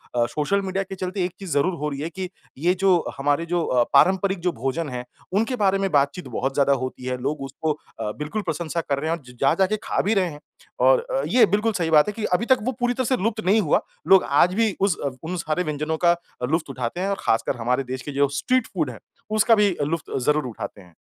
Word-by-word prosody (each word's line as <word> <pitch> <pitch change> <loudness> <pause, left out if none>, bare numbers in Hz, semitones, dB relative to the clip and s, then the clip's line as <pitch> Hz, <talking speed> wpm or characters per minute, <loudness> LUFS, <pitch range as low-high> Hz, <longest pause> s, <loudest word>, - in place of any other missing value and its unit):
अ, 120 -1 +3
social 155 - 0
media 195 0 -2
के 195 0 -8
चलते 185 +1 -3
एक 180 - -3
चीज़ 190 -4 -7
ज़रूर 145 +6 +2
हो 150 -2 -2
रही 140 -1 -5
है 160 - -3
कि 185 +2 -5 0.3
ये 170 +6 +2
जो 185 -3 +4
हमारे 145 +4 +1
जो 170 0 0
अ, 125 -1 +3
पारंपरिक 190 +5 +4
जो 180 +1 0
भोजन 135 +5 -3
है 125 -1 -5 0.3
उनके 225 +6 +1
बारे 195 -4 +2
में 195 0 0
बातचीत 145 +5 +1
बहुत 135 +1 -2
ज़्यादा 140 0 +3
होती 130 0 -6
है। 130 0 -2
लोग 140 +2 -2
उसको 140 +4 -2 0.3
अ, 105 - -2
बिल्कुल 150 +9 -3
प्रशंसा 170 -2 -2
कर 140 -3 -2
रहे 160 +2 -2
हैं 170 - 0
और 150 - -19
ज - - -17
जा 135 - +4
के 215 +3 -1
खा - - 0
भी 210 - +1
रहे 190 -4 +2
हैं। 145 -2 -10 0.4
और - - +5
अ, - - -2
ये 245 - +6
बिल्कुल 210 +4 +1
सही 170 -5 -1
बात 150 -1 +6
है 210 - -2
कि 215 0 -3
अभी 205 +6 +2
तक 260 0 +4
वो 255 - 0
पूरी 245 0 +1
तरह 255 +1 -1
से 260 +2 +1
लुप्त 220 0 0
नहीं 210 +4 +4
हुआ। 155 - +2 0.3
लोग 190 +1 +7
आज 170 +6 +4
भी 215 -2 +1
उस 195 -3 +2
अव 135 -2 -3
उन 170 +3 -3
सारे 160 +1 -1
व्यंजनों 150 0 -2
का 170 0 +6 0.4
लुफ़्त 160 -2 0
उठाते 130 +6 -3
हैं 195 - 0
और 200 - -1
खासकर 115 +3 0
हमारे 125 +3 0
देश 130 0 -5
के 145 - -6
जो 140 +1 +2
स्ट्रीट 255 -2 +1
फ़ूड 160 -7 -2
है 115 - -11 0.3
उसका 215 +2 +4
भी 205 -4 +3 0.2
लुफ़्त 165 -2 -3
ज़रूर 150 -1 +2
उठाते 110 -3 -7
हैं। 90 -2 -19
170 Hz, 255 wpm, -23 LUFS, 140-195 Hz, 0.4 s, लोग